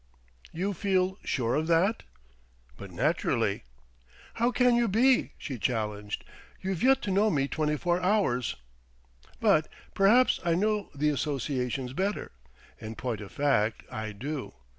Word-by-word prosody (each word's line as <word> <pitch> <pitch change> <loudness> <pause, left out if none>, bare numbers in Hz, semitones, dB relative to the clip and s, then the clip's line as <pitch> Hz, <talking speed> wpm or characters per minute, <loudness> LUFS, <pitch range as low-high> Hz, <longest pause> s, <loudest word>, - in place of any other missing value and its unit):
"You 195 +5 -2
feel 190 0 0
sure 120 -3 -1
of 155 +2 0
that?" 175 +7 +2 0.7
"But - - -9
naturally." - - 0 0.7
"How 235 +1 +1
can 250 -1 +3
you 240 0 +3
be?" 245 +6 +3
she 130 -5 -6
challenged. 105 -3 -2 0.3
"You've 190 -3 -3
yet 265 +1 +4
to 200 - -2
know 205 +3 +3
me 140 -6 +1
twenty 150 0 -1
four 175 +3 0
hours." 180 - +1 0.8
"But - - +3 0.3
perhaps 225 +6 +4
I 170 -1 +2
know 210 +2 0
the 150 +2 +1
associations 135 -3 -2
better. 195 +7 -2 0.5
In 110 0 -7
point 115 -4 -3
of 100 - -9
fact, 115 -7 +1
I 110 -1 -4
do. 135 +7 -5
160 Hz, 140 wpm, -28 LUFS, 125-200 Hz, 0.8 s, yet